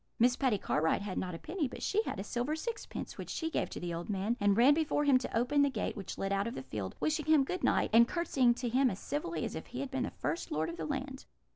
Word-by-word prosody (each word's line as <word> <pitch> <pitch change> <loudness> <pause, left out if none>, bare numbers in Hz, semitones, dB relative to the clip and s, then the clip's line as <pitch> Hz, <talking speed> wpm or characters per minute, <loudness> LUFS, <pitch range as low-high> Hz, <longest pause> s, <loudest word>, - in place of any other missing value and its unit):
Miss 245 +2 +4
Patty 255 -6 +2
Cartwright 160 +1 +1
had 200 -2 -3
not 180 -2 -3
a - - -5
penny, 320 - -2
but - - -8
she 425 - +2
had 445 - -4
a - - -2
silver 245 +7 -2
sixpence, 455 +8 -5
which - - -6
she 325 0 -2
gave - - -1
to - - -6
the 175 -1 -4
old 170 +3 -5
man, 205 +3 0
and 205 0 +3
ran 255 +5 +7
before 300 -1 +1
him 275 -3 +5
to 250 - -3
open 265 +5 +3
the 285 - +4
gate 265 - -3
(which 200 -4 -6
led 195 0 -1
out 200 +2 0
of 230 - -4
the 130 - -5
field), 105 -7 -5
wishing 310 -1 0
him 310 -3 +6
good 365 +7 -4
night, - - +2
and 235 +1 +7
curtseying 265 -8 +2
to 245 0 -3
him 255 +3 +3
as 185 - -4
civilly 185 - -3
as - - -4
if 160 - -6
he 250 - -6
had 275 -1 -4
been 265 -2 -1
the - - -3
first 155 +3 -3
lord 155 +2 0
of 170 - -6
the 160 - -3
land. 265 - -4
245 Hz, 285 wpm, -32 LUFS, 195-285 Hz, -, ran